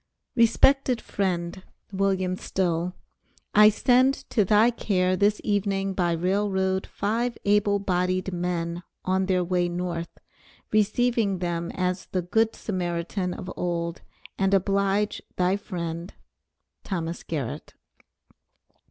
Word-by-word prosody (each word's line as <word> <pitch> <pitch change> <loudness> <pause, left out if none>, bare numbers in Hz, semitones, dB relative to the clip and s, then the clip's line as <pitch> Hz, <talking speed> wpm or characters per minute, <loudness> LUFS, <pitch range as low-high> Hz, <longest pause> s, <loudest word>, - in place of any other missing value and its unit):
RESPECTED 250 +2 +4
FRIEND: 180 -2 -2 0.3
WILLIAM 190 -2 0
STILL, 180 -1 -1 0.6
I 210 +1 +8
send 255 +5 +3
on - - -12
to 215 - +3
thy 215 +5 +4
care 185 -5 +1
this 205 +2 +2
evening 195 -2 0
by 175 -2 +1
Rail 190 +5 0
Road, 190 0 0
5 230 +4 -1
able 205 0 +3
bodied 185 -1 -1
men, 175 -1 -2 0.2
on 190 0 +1
their 185 -2 +2
way 175 0 0
North; 175 -1 -3 0.6
receive 230 +3 +2 0.2
them 170 -1 -2
as 180 0 -1
the 185 -2 -2
Good 220 +5 +1
Samaritan 180 -1 -3
of 180 - -7
old 170 -1 -2 0.4
and 195 0 +3
oblige 200 +2 +1
thy 180 +1 +2
friend, 170 -3 -5 0.7
THOMAS 170 -3 -3
GARRETT. 145 -8 -5
190 Hz, 115 wpm, -26 LUFS, 175-205 Hz, 0.7 s, I